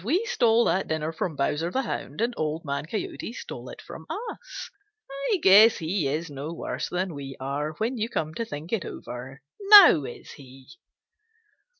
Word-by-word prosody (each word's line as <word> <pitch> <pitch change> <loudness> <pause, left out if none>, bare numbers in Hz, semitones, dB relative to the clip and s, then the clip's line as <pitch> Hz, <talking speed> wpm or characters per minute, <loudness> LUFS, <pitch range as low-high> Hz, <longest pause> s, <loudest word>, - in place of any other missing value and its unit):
We 340 - +1
stole 235 - +3
that 190 - +1
dinner 160 0 -2
from 160 0 -3
Bowser 150 +4 -1
the 265 +9 -1
Hound, 150 - -5
and 240 +2 0
Old 155 +1 -3
Man 140 +1 -3
Coyote 220 +3 -5
stole - - -8
it - - -10
from - - -11
us. 455 -1 -7 0.6
I 415 - +3
guess 210 +4 +7
he 165 -1 -1
is 155 +4 -2
no 145 +1 -6
worse - - -4
than 180 0 -2
we 135 -2 -8
are, 140 +3 -3
when 230 +8 -3
you 220 +2 -1
come 155 -8 -3
to 230 - -3
think 155 -3 -7
it 210 -7 0
over. 130 +3 -8 0.2
Now 400 - +8
is 120 - -9
he?" 135 -1 -14
165 Hz, 180 wpm, -26 LUFS, 145-225 Hz, 0.6 s, Now